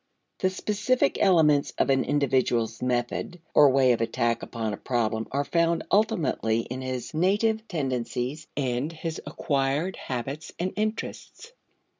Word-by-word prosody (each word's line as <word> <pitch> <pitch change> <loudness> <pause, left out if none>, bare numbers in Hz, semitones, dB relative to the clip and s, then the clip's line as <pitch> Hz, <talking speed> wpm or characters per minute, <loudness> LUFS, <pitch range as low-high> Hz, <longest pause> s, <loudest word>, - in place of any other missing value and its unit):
The 185 - +2
specific 210 +6 0
elements 155 -7 +4
of - - +2
an 135 -1 +3
individual's 125 -5 +1
method 125 +7 -2
or 145 -1 +7
way 130 -1 +4
of 115 - +1
attack 115 0 0
upon 110 -3 -3
a - - -4
problem 115 -3 -1
are 140 +1 0
found 170 +1 +1
ultimately 155 - +2
in 125 +3 -6
his 130 +1 -4
native 215 +6 +1
tendencies 135 - -3
and 130 +2 -1
his 165 0 -5
acquired 145 +4 -1
habits 135 +4 -5
and 185 +2 -2
interests. 215 - -4
140 Hz, 135 wpm, -26 LUFS, 125-175 Hz, -, or